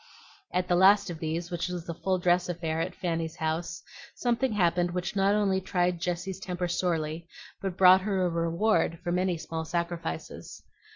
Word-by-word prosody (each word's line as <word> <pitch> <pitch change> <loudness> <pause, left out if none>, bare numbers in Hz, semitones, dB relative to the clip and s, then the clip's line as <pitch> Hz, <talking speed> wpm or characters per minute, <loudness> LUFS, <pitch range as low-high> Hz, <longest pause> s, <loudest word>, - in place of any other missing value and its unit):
At 180 0 0
the 175 - +2
last 195 +1 +5
of 165 - -7
these, 165 +2 -3
which 175 +1 -2
was 180 -2 -5
a 170 - -3
full 185 +3 -1
dress 180 0 +2
affair 165 -2 -2
at 180 +1 -3
Fanny's 165 -3 -2
house, 160 +2 -3 0.3
something 245 0 0
happened 175 -3 +2
which 180 +3 -3
not 195 +1 +3
only 195 -2 +1
tried 180 -2 0
Jessie's 180 +2 -3
temper 180 -1 -3
sorely, 165 -2 -1 0.3
but 195 -2 -3
brought 185 0 +7
her 190 -2 0
a - - +1
reward 170 +1 +1
for 175 - -2
many 180 0 +1
small 160 0 -5
sacrifices. 170 - -4
175 Hz, 175 wpm, -28 LUFS, 170-185 Hz, 0.3 s, brought